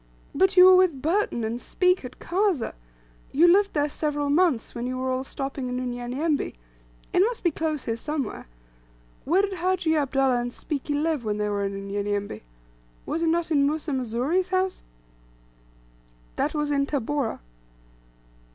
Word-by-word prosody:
"But 380 +6 +2
you 365 - +10
were 370 0 +9
with 365 -7 +3
Burton, 330 - 0
and 230 +2 -3
Speke, 365 -2 +1
at 250 - -9
Kazeh; 365 - 0 0.6
you 330 +5 +5
lived 395 +3 +4
there 290 -1 +1
several 290 -1 -2
months, 315 -6 +2
when 240 0 -4
you 255 0 -3
were 260 0 -1
all 255 0 -1
stopping 270 -1 -4
in 250 0 -2
Unyanyembe; 255 +5 -2 0.6
it - - +3
must 450 +5 +1
be 345 - +3
close 310 -2 -2
here; 225 - -2
somewhere. 280 - -4 0.8
Where 360 +7 +3
did 400 -1 -1
Hajji 360 -2 +1
Abdullah 270 -4 +2
and 245 0 -4
Spiki 290 +2 -4
live 305 -2 0
when 210 -1 -1
they 210 0 -1
were 200 -1 -1
in 195 0 -3
Unyanyembe? 200 - -3 0.6
Was 330 - -2
it 335 - +1
not 335 0 0
in 280 -2 +4
Musa 305 +1 -2
Mzuri's 260 +8 0
house?" 375 0 0 1.5
"That - - -1
was 295 -1 0
in 280 -1 +1
Tabora." 285 -2 -2
290 Hz, 160 wpm, -25 LUFS, 250-340 Hz, 1.5 s, you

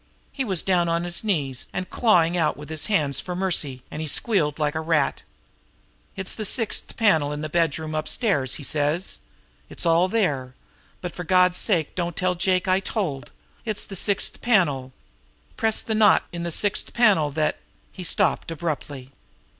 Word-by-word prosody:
"He 270 - -2
was 190 -8 0
down 175 -3 +2
on 170 +1 0
his 175 +2 -2
knees 145 - -1
and 185 0 -4
clawing 180 -7 +3
out 160 -3 +1
with 150 +1 -10
his 160 -1 -1
hands 150 -10 +1
for 180 - -5
mercy, 160 -9 0
and 155 - -5
he 160 - -3
squealed 150 -3 0
like 150 -2 0
a 160 - -2
rat. 160 -3 +1 0.9
'It's 190 -1 -3
the 220 - -3
sixth 225 +1 -2
panel 160 -10 +3
in 150 0 -4
the 155 - -4
bedroom 160 -1 0
upstairs,' 155 - 0
he 145 - -8
says; 150 - -1 0.5
'it's - - -6
all 170 +2 +4
there. 145 - -1 0.5
But 180 -2 -5
for 180 - -6
God's 180 +1 +4
sake 170 -8 +2
don't 175 -2 -3
tell 185 -1 +1
Jake 185 +1 0
I 185 0 +3
told. 150 - -3 0.3
It's 215 -3 -3
the 195 - -8
sixth 200 +2 -2
panel. 150 - +2 0.6
Press 220 -2 0
the 220 - -1
knot 215 -2 +5
in 170 - -5
the 170 0 -3
sixth 205 +5 0
panel 205 -11 +4
that 155 -1 +1 0.2
'" - - -36
He 185 - -8
stopped 170 - +1
abruptly. 145 -5 -4
170 Hz, 180 wpm, -24 LUFS, 150-190 Hz, 0.9 s, knot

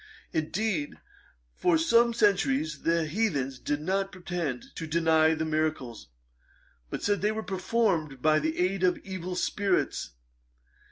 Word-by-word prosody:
Indeed, 165 0 -1 0.6
for 170 - +2
some 235 +9 +4
centuries 160 - +1
the 165 -1 +1
heathens 150 - -1
did 145 +2 -2
not 195 +4 -1
pretend 175 -8 -4
to 165 - -4
deny 160 0 +3
the 160 0 -2
miracles; 155 -7 -2 0.8
but - - -5
said 205 0 +1
they 210 +1 +2
were 220 0 -4
performed 185 - 0
by 155 +3 +3
the 160 +1 -2
aid 185 +1 0
of 180 -1 +3
evil 185 -1 -5
spirits. 195 - 0
165 Hz, 130 wpm, -28 LUFS, 155-195 Hz, 0.8 s, some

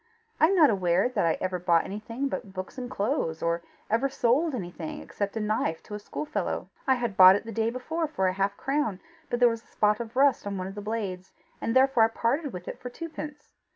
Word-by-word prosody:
I 315 - +7
am 390 - +2
not 310 -8 +6
aware 185 +2 +2
that 250 -9 +1
I 165 - +1
ever 185 -1 -2
bought 170 -1 +3
anything 230 +6 -4
except 205 -8 -4
books 185 +7 -6
and 250 -1 -5
clothes, 205 - -1
or 170 0 0 0.3
ever 230 +5 +1
sold 270 +4 +2
anything 175 -6 -6
except 205 +1 -4
a - - 0
knife 210 -6 -1
to - - -10
a 210 - -4
schoolfellow. 295 +8 -3 0.2
I 265 - +5
had 240 -5 -2
bought 185 0 +9
it 205 - -3
the 230 - -6
day 225 +1 0
before 315 +7 -2
for 240 -11 -1
half 195 +1 0
a - - -30
crown, 270 -9 -1 0.3
but 240 - -1
there 245 - +7
was 230 -1 -1
a - - -28
spot 210 -1 +2
of 235 0 -6
rust 270 -5 +3
on 200 -1 -3
one 185 - -3
of 190 - -6
the 205 - -6
blades, 200 -4 -4 0.3
and 230 - -1
therefore 260 -3 +5
I - - +3
parted 260 +6 -1
with 180 -3 -8
it - - -6
for 250 - -6
twopence. 300 0 -8
225 Hz, 235 wpm, -27 LUFS, 190-260 Hz, 0.3 s, bought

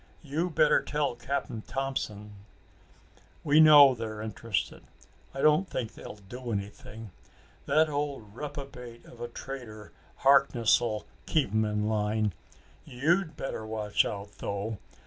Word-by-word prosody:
You 160 +5 -1
better 160 - +4
tell 150 -3 -1
Cap'n 120 -2 -3
Thompson." 110 -6 -4 1.1
"We 150 +1 +4
know 145 -3 +9
they're 110 -2 -5
interested. 110 -2 -3 0.5
I 135 - -5
don't 155 +6 +4
think 115 -4 -4
they'll - - -9
do 125 +2 -6
anything. 105 +1 -6 0.6
That 155 +1 +4
old 145 -8 -4
reprobate 135 -4 -8
of 120 - -14
a 120 - -3
Trader 120 -4 -8 0.3
Harkness'll 120 -5 +3 0.2
keep 145 -10 +1
'em 110 0 +2
in 105 0 -1
line. 105 -1 0 0.5
You'd 155 +5 0
better 135 -4 -4
watch 110 -1 0
out, 100 0 -5
though. 100 +1 -4
120 Hz, 125 wpm, -29 LUFS, 105-140 Hz, 1.1 s, know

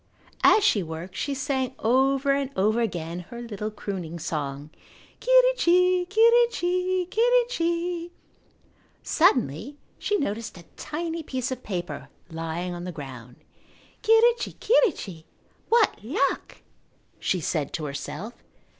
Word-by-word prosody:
As 430 - +6
she 225 - +3
worked 170 +2 -7
she 280 - -2
sang 265 -2 -2
over 270 +4 +2
and 275 -1 0
over 215 +5 +2
again 175 -5 -3
her 235 - -8
little 215 -3 -5
crooning 190 -6 -5
song, 145 -2 -4 0.5
"Quirrichi, 365 -8 +4
quirrichi, 390 -5 +3
quirrichi." 355 -8 +1 0.9
Suddenly 270 - +2 0.2
she 415 - 0
noticed 225 - -3
a 170 - -12
tiny 330 +2 -4
piece 260 -3 -3
of 255 -1 -4
paper 175 - -5 0.2
lying 165 +2 -4
on 175 0 -6
the 180 - -4
ground. 130 -6 -9 0.7
"Quirrichi, 465 +1 +4
quirrichi, 240 - +1 0.4
what 455 - +3
luck!" 275 - -1 0.6
she 185 - 0
said 155 -3 -2
to 155 - -3
herself. 180 +10 -6
255 Hz, 115 wpm, -25 LUFS, -, 0.9 s, As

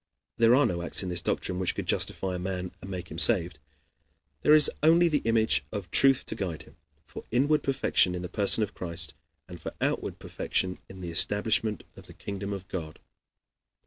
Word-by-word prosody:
There 115 +1 +5
are 145 +1 +4
no 85 -1 -2
acts 85 - +1
in 95 - -4
this 90 -1 -1
doctrine 90 +2 -2
which 95 - 0
could - - -4
justify 95 -1 0
a 90 - -4
man 90 0 -4
and 95 - -9
make 90 -3 -7
him 80 - -5
saved. 75 - +4 0.8
There 150 - +6
is 150 - +7
only 165 +3 +5
the 150 -3 0
image 110 -11 +2
of 95 -5 -6
truth 135 -1 +5
to - - -4
guide 90 -6 -5
him, - - -20 0.3
for - - -10
inward 145 +6 +2
perfection 130 -9 +1
in 90 - -5
the - - -4
person 100 +4 +1
of 105 - -5
Christ, 85 -2 -5 0.3
and 90 -2 -11
for - - -7
outward - - -2
perfection 90 -1 -3
in 95 -1 -11
the 85 -2 -5
establishment 105 +4 +1
of - - -14
the - - -14
kingdom 100 0 -6
of 95 -1 -6
God. 80 -5 -6
95 Hz, 200 wpm, -27 LUFS, 90-115 Hz, 0.8 s, is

